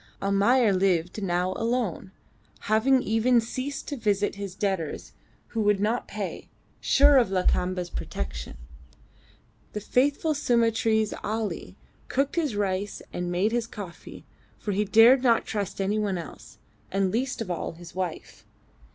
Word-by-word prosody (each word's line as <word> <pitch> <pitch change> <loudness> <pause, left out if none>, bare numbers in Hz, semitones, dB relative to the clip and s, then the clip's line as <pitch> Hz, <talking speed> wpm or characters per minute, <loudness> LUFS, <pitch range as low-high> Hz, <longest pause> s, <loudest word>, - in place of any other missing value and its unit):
Almayer 200 +3 +3
lived 185 0 +1
now 180 -1 0
alone, 230 -5 -2 0.5
having 250 +5 +3
even 230 +3 +3
ceased 255 +5 -4
to 290 - -3
visit 205 -4 0
his 200 -2 -6
debtors 190 -7 -3 0.4
who 225 - -2
would 205 -1 +3
not 220 +4 0
pay, - - -6 0.3
sure 285 0 +5
of 235 - +2
Lakamba's 180 -1 0
protection. 65 -1 -5 1.2
The 210 - -2
faithful 280 +8 +1
Sumatrese 225 -5 +2
Ali 220 0 -3 0.3
cooked 275 +3 0
his 305 -10 0
rice 200 0 -2
and 175 0 -3
made 185 +5 +1
his 235 -1 -1
coffee, 185 -6 -10 0.3
for 210 - -4
he 205 +2 +1
dared 230 +5 +6
not 235 -3 +3
trust 205 -3 -4
any 200 +2 0
one 200 -3 -1
else, 170 - -10 0.3
and 195 -1 +1
least 250 +5 -1
of 215 -6 -3
all 170 - -3
his 170 +1 -12
wife. 185 -3 -5
210 Hz, 140 wpm, -26 LUFS, 185-235 Hz, 1.2 s, dared